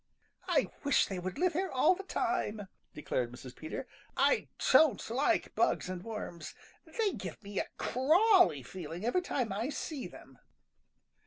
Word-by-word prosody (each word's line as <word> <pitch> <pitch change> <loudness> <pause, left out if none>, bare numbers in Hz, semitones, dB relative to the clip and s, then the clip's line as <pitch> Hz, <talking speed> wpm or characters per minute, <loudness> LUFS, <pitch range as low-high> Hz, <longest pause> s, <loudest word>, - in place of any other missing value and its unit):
_ - - -52 0.4
"I - - +2
wish 285 - +4
they 190 -2 -4
would 180 +1 -5
live 360 0 +2
here 375 +4 -1
all 265 +6 +4
the 380 - -6
time," 350 - -2 0.3
declared 125 -5 -2
Mrs. 125 +1 -10
Peter. 160 +11 -6 0.3
"I - - +3 0.2
don't 300 -10 +5
like 290 +8 +1
bugs - - +1
and 185 -1 -5
worms. 210 -7 -6 0.3
They 440 -4 0
give - - -7
me 200 0 -4
a - - -2
crawly 330 - +4
feeling 175 - -7
every 250 +10 +2
time 250 - -2
I 225 +7 -2
see 285 - -4
them." 135 -6 -15
235 Hz, 160 wpm, -32 LUFS, -, 0.4 s, don't